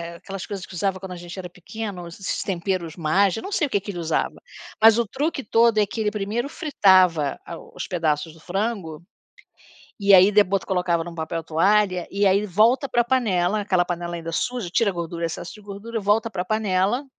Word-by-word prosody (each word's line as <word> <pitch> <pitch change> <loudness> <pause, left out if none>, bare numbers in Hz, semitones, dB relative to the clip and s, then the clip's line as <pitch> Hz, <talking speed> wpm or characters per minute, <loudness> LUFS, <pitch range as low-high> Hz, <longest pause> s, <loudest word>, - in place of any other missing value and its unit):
aquelas 195 +2 -7
coisas 195 -2 -6
que - - -14
usava 190 +1 -1
quando 190 -1 -8
a 180 - -5
gente 175 +2 -9
era 185 - -5
pequeno, 180 0 -7
esses 180 +3 -4
temperos 180 -3 -3
mais, 180 +4 +2
eu - - -6
não 395 - -6
sei 320 -7 +1
o - - -13
que 200 - +1
que 205 +1 -7
ele 175 - -6
usava. 165 -1 -2 0.4
Mas 225 0 +7
o 235 - +2
truque 290 +4 -2
todo 230 +1 +3
é 210 - +4
que 220 +2 -5
ele 210 - +1
primeiro 215 +6 -2
fritava 185 - +3
a 170 - -7
os - - -8
pedaços 160 -3 -1
do 165 - -18
frango, 180 -3 -3 1.0
e 200 0 +4
aí 190 +2 +7
de 210 0 +7
bota 195 0 -2
colocava 180 -3 0
em - - -8
um 170 - -9
papel 165 0 -4
toalha 185 +2 +2
e 200 +1 +1
aí 195 +2 +3
volta 225 - +3
ele - - -22
para 240 -1 +2
panela, 215 -6 +1
aquela 185 -3 +1
panela 175 -1 -4
ainda 165 0 -6
suja, 245 -1 -2
tira 210 +2 +2
gordura, 170 -1 -4
excesso 165 +2 -5
de 215 - -13
gordura, 210 +3 -6
volta 210 +3 +2
para 180 -3 -3
panela, 215 +4 0
195 Hz, 215 wpm, -23 LUFS, 175-215 Hz, 1.0 s, Mas